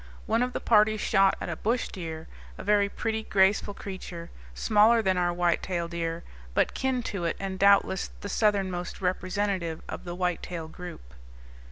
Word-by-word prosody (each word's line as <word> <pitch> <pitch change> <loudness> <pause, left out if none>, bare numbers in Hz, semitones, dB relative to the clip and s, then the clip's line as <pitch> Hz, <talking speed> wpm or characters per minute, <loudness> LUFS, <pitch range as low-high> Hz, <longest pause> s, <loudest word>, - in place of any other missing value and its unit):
One 225 +2 +1
of 250 0 0
the - - -2
party 215 -1 +4
shot 195 -2 +3
a - - -3
bush 235 +3 -1
deer 160 -3 -6 0.3
a - - -7
very 205 0 +3
pretty, 220 +1 -2
graceful 200 0 +2
creature, 180 -3 -7 0.2
smaller 220 - +4
than 190 -2 +2
our 175 -1 +1
whitetail 175 0 0
deer, 170 0 -3 0.3
but - - +2
kin 260 -2 -1
to 190 -6 -3
it 165 - -1
and 190 -1 -4
doubtless 200 -1 +4
the - - -5
southernmost 195 -4 0
representative 185 -2 -1
of - - -6
the 175 -1 -6
whitetail 180 -2 -2
group. 160 - -10
190 Hz, 160 wpm, -27 LUFS, 175-210 Hz, 0.3 s, party